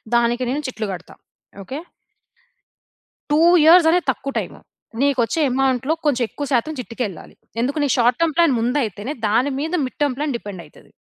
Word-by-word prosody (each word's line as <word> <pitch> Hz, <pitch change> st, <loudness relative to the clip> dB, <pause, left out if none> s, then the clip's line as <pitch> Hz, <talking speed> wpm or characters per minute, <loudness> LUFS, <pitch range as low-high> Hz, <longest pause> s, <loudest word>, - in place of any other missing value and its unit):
దానికి 240 Hz, +1 st, +2 dB
నేను 290 Hz, +4 st, -1 dB
చిట్లు 220 Hz, -4 st, -4 dB
గడతా. 180 Hz, 0 st, -10 dB, 0.5 s
Okay. 265 Hz, +10 st, -6 dB, 1.5 s
2 300 Hz, -, +4 dB, 0.2 s
years 330 Hz, +1 st, +7 dB
అనేది 355 Hz, 0 st, +1 dB
తక్కువ 275 Hz, +2 st, -6 dB
టైము. -, -, -7 dB, 0.4 s
నీకొచ్చే 280 Hz, +2 st, +1 dB
అమౌంట్‌లో 265 Hz, +2 st, +1 dB
కొంచెం 255 Hz, -4 st, +2 dB
ఎక్కువ 290 Hz, -, -5 dB
శాతం 255 Hz, +6 st, +1 dB
చిట్టుకెళ్ళాలి. 225 Hz, -5 st, -6 dB, 0.3 s
ఎందుకు 275 Hz, +5 st, -1 dB
నీకు 285 Hz, -, +1 dB
షార్ట్ 245 Hz, +1 st, +3 dB
టర్మ్ 325 Hz, -3 st, +1 dB
ప్లాన్ 335 Hz, -5 st, +4 dB
ముందైయితేనే 240 Hz, 0 st, -1 dB
దాని 240 Hz, +7 st, +2 dB
మీద 320 Hz, +4 st, -3 dB
మిడ్ 255 Hz, -, -8 dB
టర్మ్ 285 Hz, -3 st, 0 dB
ప్లాన్ 290 Hz, -4 st, -2 dB
డిపెండయితది. 195 Hz, -6 st, -11 dB
260 Hz, 150 wpm, -21 LUFS, 235-295 Hz, 1.5 s, years